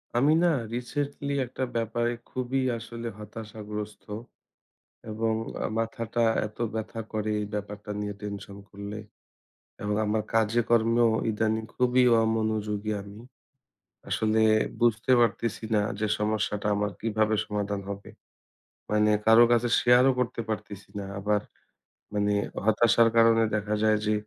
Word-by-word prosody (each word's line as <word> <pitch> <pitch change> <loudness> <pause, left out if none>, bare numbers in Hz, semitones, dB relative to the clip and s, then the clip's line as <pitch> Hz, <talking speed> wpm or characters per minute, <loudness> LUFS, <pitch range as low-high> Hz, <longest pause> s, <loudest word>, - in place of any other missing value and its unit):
আমি 140 +6 +4
না - - +5 0.3
রিসেন্টলি 140 +3 -3
একটা 130 +2 -5
ব্যাপারে 115 +1 0 0.2
খুবই 130 +1 -1 0.2
আসলে 115 +1 -7
হতাশাগ্রস্ত 105 -1 -7 1.1
এবং 110 +1 0 0.5
মাথাটা 115 +1 -1 0.2
এত 105 - -13 0.2
ব্যথা 110 +1 -4
করে 110 0 -1
এই 105 - -3
ব্যাপারটা 105 0 -6
নিয়ে 105 0 -3
টেনশন 100 -1 -6
করলে 100 +2 -7 0.8
এবং 105 0 -1
আমার 105 +1 +1
কাজে 115 +1 +3
কর্মেও 115 0 +4 0.2
ইদানিং 110 +1 0
খুবই 125 0 +3 0.2
অমনোযোগী 110 -1 -1
আমি। 100 +1 -11 0.9
আসলে 110 0 +2 0.4
বুঝতে 120 +1 +2
পারতেছি 115 -1 0
না 105 - +4 0.2
যে 110 - 0
সমস্যাটা 105 -1 -1
আমার 105 0 -1
কিভাবে 110 -1 +1
সমাধান 105 -1 -2
হবে? 100 0 -7 0.8
মানে 105 0 +3
কারো 115 +2 +8
কাছে 120 0 +3
share 125 +1 +5
ও - - +5
করতে 125 -1 -1
পারতেছি 105 -2 -5
না। 100 - -5
আবার 105 +1 +1 0.7
মানে 105 0 +1 0.3
হতাশার 115 +1 +4
কারণে 115 0 +6
দেখা 105 0 -1
যায় 110 -1 +4
যে 105 - +2
110 Hz, 125 wpm, -27 LUFS, 105-115 Hz, 1.1 s, কারো